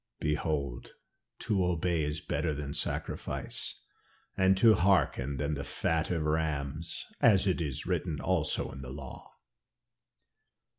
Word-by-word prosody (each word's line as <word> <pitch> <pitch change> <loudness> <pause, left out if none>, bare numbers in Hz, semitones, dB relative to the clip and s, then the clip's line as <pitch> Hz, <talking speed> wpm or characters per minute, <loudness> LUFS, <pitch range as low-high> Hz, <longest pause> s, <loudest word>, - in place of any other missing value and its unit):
'Behold 75 -4 -2 0.4
to 100 -4 +1
obey 85 -1 +1
is 75 +1 -2
better 80 -2 -1
than 70 0 -4
sacrifice, - - -3 0.5
and 95 0 +4
to 110 +3 +7
hearken 85 -8 +2
than 75 +4 -1
the 70 -1 -3
fat 80 +2 -1
of 85 -3 0
rams,' 75 0 -1 0.2
as 100 -4 +6
it 95 -3 +1
is 70 -5 -3
written 80 -5 -1
also 85 -3 0
in 70 - -8
the 65 - -7
law." 70 0 -9
80 Hz, 130 wpm, -31 LUFS, 70-90 Hz, 0.5 s, to